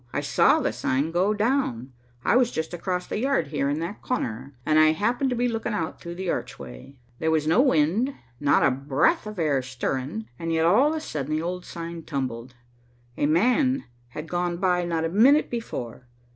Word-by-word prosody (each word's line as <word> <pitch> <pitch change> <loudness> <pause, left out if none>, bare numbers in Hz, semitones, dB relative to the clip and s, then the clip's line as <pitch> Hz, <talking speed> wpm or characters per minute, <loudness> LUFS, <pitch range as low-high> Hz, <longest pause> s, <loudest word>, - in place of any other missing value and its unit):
I - - -1
saw - - +4
the - - -1
sign 140 +5 -1
go 180 +4 +2
down, 210 - -1 0.3
I - - +3
was 250 -1 +4
just 160 -3 -4
across 180 +1 -2
the - - -3
yard 260 - 0
here 140 -2 -1
in 145 - 0
that 185 +5 -5
corner, 130 - -3
and 155 0 +4
I 155 0 +6
happened 235 - 0
to 250 - -1
be 245 +1 +1
looking 225 -1 -2
out 165 -4 -4
through 170 0 -7
the 190 +1 -5
archway. 60 - -7 0.2
There 160 - 0
was 160 -2 +1
no 165 +10 +4
wind, 220 - +2 0.2
not 145 -1 +3
a 140 - +4
breath 140 - +1
of 215 -1 -7
air 150 -5 +1
stirring, 125 -2 -4
and 165 0 -3
yet, 160 0 +2
all 220 - +5
of 315 - -2
a - - -2
sudden, 155 - -3
the 155 - -1
old 180 +1 -4
sign 170 0 -7
tumbled. 130 -5 -4 0.6
A 145 - +1
man 255 - +2 0.2
had 150 +6 -8
gone 175 0 -1
by 180 -1 +1
not 165 -1 -1
a - - -1
minute 255 - +4
before. 125 - -5
165 Hz, 200 wpm, -25 LUFS, 140-215 Hz, 0.6 s, I